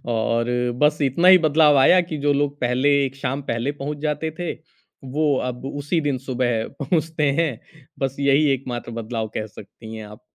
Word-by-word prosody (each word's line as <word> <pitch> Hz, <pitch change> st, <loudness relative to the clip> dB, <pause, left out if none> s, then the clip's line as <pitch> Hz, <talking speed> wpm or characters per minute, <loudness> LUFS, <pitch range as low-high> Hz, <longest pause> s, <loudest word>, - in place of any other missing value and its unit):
और 115 Hz, +1 st, 0 dB, 0.3 s
बस 150 Hz, 0 st, +4 dB
इतना 145 Hz, +7 st, +3 dB
ही 185 Hz, 0 st, +9 dB
बदलाव 150 Hz, -1 st, +5 dB
आया 180 Hz, +7 st, +6 dB
कि 155 Hz, -, -4 dB
जो 145 Hz, 0 st, +1 dB
लोग 145 Hz, 0 st, -1 dB
पहले 125 Hz, +3 st, +1 dB, 0.2 s
एक 135 Hz, 0 st, -5 dB
शाम 135 Hz, +1 st, -3 dB
पहले 115 Hz, +5 st, -1 dB
पहुँच 150 Hz, +1 st, -4 dB
जाते 150 Hz, +2 st, -2 dB
थे 175 Hz, -1 st, -3 dB, 0.6 s
वो 150 Hz, -2 st, +2 dB
अब 125 Hz, 0 st, -7 dB
उसी 145 Hz, +4 st, -1 dB
दिन 145 Hz, -3 st, -1 dB
सुबह 125 Hz, -3 st, -1 dB, 0.2 s
पहुँचते 155 Hz, 0 st, 0 dB
हैं। 150 Hz, -1 st, -5 dB
बस 135 Hz, 0 st, -2 dB
यही 140 Hz, +2 st, +3 dB
एक 135 Hz, 0 st, -3 dB
मात्र 120 Hz, -1 st, -5 dB
बदलाव 110 Hz, -1 st, -4 dB
कह 110 Hz, -, -3 dB
सकती 110 Hz, +1 st, -12 dB
हैं 110 Hz, -1 st, -8 dB
आप। 105 Hz, 0 st, -13 dB
140 Hz, 185 wpm, -22 LUFS, 120-150 Hz, 0.6 s, ही